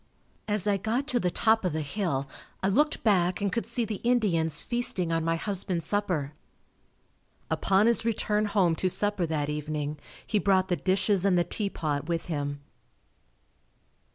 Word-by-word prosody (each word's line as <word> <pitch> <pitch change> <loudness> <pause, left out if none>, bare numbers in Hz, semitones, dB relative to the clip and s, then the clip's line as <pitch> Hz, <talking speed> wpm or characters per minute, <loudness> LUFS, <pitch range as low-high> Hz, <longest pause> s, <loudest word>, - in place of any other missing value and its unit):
As 210 -3 -1
I 205 -1 +2
got 225 +7 -1
to 250 - +2
the 180 - +1
top 220 +5 +2
of 180 -4 0
the 155 - -1
hill 145 -4 -2 0.4
I 190 - +3
looked 295 +9 +2
back 185 -5 +2
and 200 -2 0
could 230 - -2
see 235 0 -1
the 215 -2 -5
Indians 175 -10 +2
feasting 240 -8 -1
on 165 0 0
my 165 0 +1
husband's 180 -2 -2
supper. 175 -6 -1 1.2
Upon 195 +2 +3
his 235 -1 +2
return 215 -2 0
home 195 -5 +2
to 185 - +1
supper 205 -2 +1
that 150 -2 -1
evening, 150 0 -3 0.3
he 210 - +1
brought 190 -2 +2
the 175 - +2
dishes 190 +1 +1
and 195 -3 +3
the 175 - +4
teapot 155 -8 -2
with 165 -1 -1
him. 145 -1 -3
190 Hz, 165 wpm, -28 LUFS, 165-210 Hz, 1.2 s, the